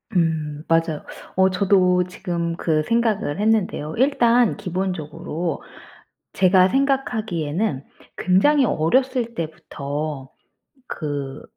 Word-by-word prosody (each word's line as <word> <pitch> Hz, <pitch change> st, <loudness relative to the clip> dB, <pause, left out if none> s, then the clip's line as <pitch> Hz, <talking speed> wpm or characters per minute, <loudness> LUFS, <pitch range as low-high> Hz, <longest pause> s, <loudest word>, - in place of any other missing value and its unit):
음 155 Hz, -3 st, 0 dB
맞아요. 165 Hz, -2 st, +1 dB, 0.3 s
어 190 Hz, 0 st, +4 dB
저도 185 Hz, -1 st, +3 dB
지금 170 Hz, -2 st, -3 dB
그 155 Hz, -2 st, 0 dB
생각을 220 Hz, -6 st, 0 dB
했는데요 210 Hz, -8 st, 0 dB
일단 245 Hz, -3 st, +3 dB
기본적으로 175 Hz, -3 st, -4 dB, 0.7 s
제가 185 Hz, 0 st, +4 dB
생각하기에는 215 Hz, -, -1 dB, 0.3 s
굉장히 265 Hz, +10 st, +3 dB
어렸을 235 Hz, -, +1 dB
때부터 150 Hz, -4 st, -5 dB, 0.6 s
그 145 Hz, -3 st, -5 dB
180 Hz, 220 characters per minute, -22 LUFS, 155-220 Hz, 0.7 s, 어